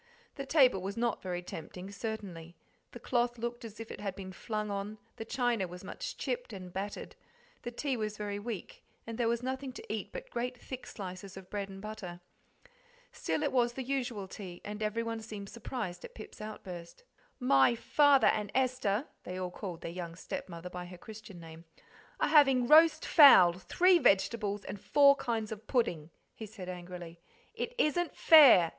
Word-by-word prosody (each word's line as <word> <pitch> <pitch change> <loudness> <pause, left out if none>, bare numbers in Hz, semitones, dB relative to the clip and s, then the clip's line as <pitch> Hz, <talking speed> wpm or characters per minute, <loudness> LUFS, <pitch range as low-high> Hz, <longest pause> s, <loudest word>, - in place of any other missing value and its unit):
The 275 -2 -6
table 260 - +5
was 195 +3 -5
not 235 -1 0
very 180 -1 -4
tempting, 180 +3 -8
certainly; 195 -6 -6 0.4
the - - -9
cloth 240 -1 0
looked 235 +1 -4
as 220 -2 -9
if 225 - -7
it - - -8
had 195 -2 -3
been 190 -1 -8
flung 215 +2 -3
on, 200 +2 -4 0.2
the 225 - -6
china 240 -5 0
was 180 +1 -10
much - - -6
chipped - - -3
and 185 -2 -8
battered, 200 +2 -5 0.5
the - - -5
tea 265 +3 -2
was 215 -2 -3
very 205 -1 -3
weak, 245 - -7 0.2
and 230 +1 -7
there 235 - +2
was 235 +1 0
nothing 260 +1 -3
to 215 - -6
eat 210 -2 -4
but - - -8
great 250 +1 -3
thick 260 -1 -8
slices 190 -1 -8
of 190 -1 -12
bread 200 -1 -3
and 195 +1 -10
butter. 210 -5 -7 0.9
Still, 305 - -2
it 290 - +1
was 240 -2 +2
the 265 - -4
usual 245 -6 -2
tea, 185 -3 -9
and 210 +1 -6
everyone 225 +1 -2
seemed 210 -3 -8
surprised 210 -6 -5
at - - -10
Pip's 215 - -10
outburst. 185 - -8 0.4
"My 235 - +4
father 285 +3 +4
and 210 -1 -1
Esther" 255 -3 +1 0.2
(they 180 - -6
all 180 -1 -3
called 180 -3 -7
their 165 - -5
young 170 -1 -6
stepmother 170 0 -7
by 180 0 -6
her 180 0 -10
Christian 215 -2 -11
name) 165 0 -12 0.5
"are - - +2
having 270 -5 +6
roast 315 +3 +6
fowl, 190 - +8
three 350 - +3
vegetables, 205 -2 +2
and 205 - -7
four 280 -1 +6
kinds 225 -3 -2
of 220 +1 -8
pudding," 170 - 0 0.2
he 220 - -8
said 195 -3 -9
angrily; 175 -1 -8 0.3
"it 485 - -4
isn't 350 -1 +1
fair!" 270 - +8
215 Hz, 180 wpm, -32 LUFS, 185-245 Hz, 0.9 s, fowl